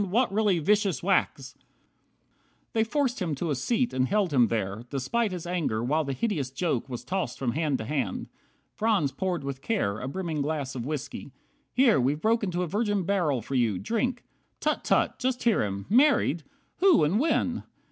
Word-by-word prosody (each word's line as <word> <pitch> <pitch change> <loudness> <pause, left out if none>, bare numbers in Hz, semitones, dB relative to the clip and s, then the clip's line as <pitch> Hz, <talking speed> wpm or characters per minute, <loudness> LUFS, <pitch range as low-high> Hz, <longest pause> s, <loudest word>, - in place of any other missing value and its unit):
What 230 +2 +2
really 210 -3 +3
vicious 200 +2 +1
whacks!" 170 -8 +1
50 - - -36 1.1
They 220 - +3
forced 250 -1 -1
him 165 -5 -1
to 160 +3 -2
a - - +1
seat, 235 - 0
and 130 0 +1
held 195 -4 +1
him 125 -4 +5
there, 105 -1 -2
Despite 205 - -1
his 180 -2 -5
anger, 165 -11 -1
while 150 +6 +1
the 140 -2 -3
hideous 155 - -1
joke 135 -2 -2
Was 125 -2 -5
tossed 185 -10 -2
from 125 -3 -1
hand 150 0 0
to 110 - -6
hand. 140 +2 -2 0.5
Franz 210 -11 +1
poured 180 -2 -2
with 135 -1 -5
care 110 - -1
A 130 - -5
brimming 160 0 -3
glass 140 -2 -2
of 125 -1 -5
whiskey. 145 -1 -5 0.4
"Here, 250 - +4
we've 140 +4 +1
broke 225 +4 +2
Into 180 -2 -1
a - - -2
virgin 205 +1 0
barrel 165 - 0
for 135 - -6
you, 115 -7 +2
drink! 240 - -1 0.4
Tut! - - 0
Tut! - - +1
Just 255 0 -1
hear 230 -3 +3
him! 100 -1 -3
Married! 245 - +4 0.4
Who, 365 - +5
and 170 +9 +2
when? 315 +5 +1
170 Hz, 190 wpm, -27 LUFS, 135-215 Hz, 1.1 s, him